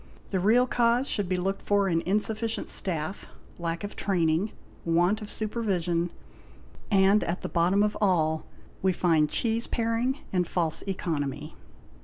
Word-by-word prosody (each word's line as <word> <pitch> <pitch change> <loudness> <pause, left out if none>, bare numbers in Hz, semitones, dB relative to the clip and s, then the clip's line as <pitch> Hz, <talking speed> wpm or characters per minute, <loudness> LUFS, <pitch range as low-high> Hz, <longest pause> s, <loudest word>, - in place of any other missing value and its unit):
The 190 - +1
real 225 +7 +4
cause 245 +1 +2
should 200 -4 -1
be 185 - +1
looked 195 +2 -2
for 200 -1 +2
in 165 -3 +1
insufficient 215 +3 -1
staff, 170 0 -2 0.3
lack 170 +1 -3
of 205 - -5
training, 175 +1 +1 0.3
want 175 +5 +2
of 210 - -7
supervision,—and 195 0 -1
at 170 - -3
the - - -1
bottom 180 +4 +3
of 210 0 0
all 160 -5 +1 0.3
we 190 0 +2
find 160 -4 +2
cheese 230 +4 0
paring 230 +3 0 0.2
and 180 -2 +1
false 165 -3 0
economy. 155 -7 -3
190 Hz, 140 wpm, -27 LUFS, 170-215 Hz, 0.3 s, real